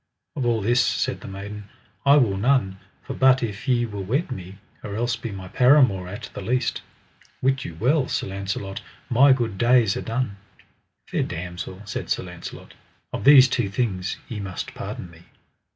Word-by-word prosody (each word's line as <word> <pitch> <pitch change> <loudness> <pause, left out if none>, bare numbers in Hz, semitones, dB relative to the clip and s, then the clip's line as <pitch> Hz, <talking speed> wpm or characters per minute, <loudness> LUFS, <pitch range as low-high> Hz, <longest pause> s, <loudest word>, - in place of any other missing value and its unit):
Of 130 -4 -1
all 115 -3 +1
this, 120 +4 +3
said - - -1
the - - -9
maiden, 100 +1 -8 0.4
I 140 - +8
will 115 -8 +3
none, 100 -3 +1 0.2
for - - -5
but 130 -1 +4
if 110 +2 -5
ye 120 -2 +3
will 105 -3 -5
wed 135 - -1
me, 95 -5 -7 0.3
or 100 -1 -5
else 120 +1 0
be 115 0 -6
my 95 -1 -7
paramour 125 -6 +4
at 100 +3 -8
the - - -6
least, 125 +2 -1 0.6
wit 135 0 +1
you 85 - -7
well, 130 +3 +2
Sir - - -1
Launcelot, 95 0 -4 0.3
my 135 +4 +6
good 115 -7 0
days 120 -4 +4
are - - -3
done. 115 -3 -2 0.7
Fair - - -1
damosel, 90 +3 -5
said - - -5
Sir - - 0
Launcelot, 90 -1 -9 0.4
of - - -4
these 135 -2 +9
two 120 -4 0
things 95 -3 -2
ye 110 - -5
must 100 -2 -5
pardon 90 - -7
me. 85 0 -16
110 Hz, 180 wpm, -24 LUFS, 95-125 Hz, 0.7 s, these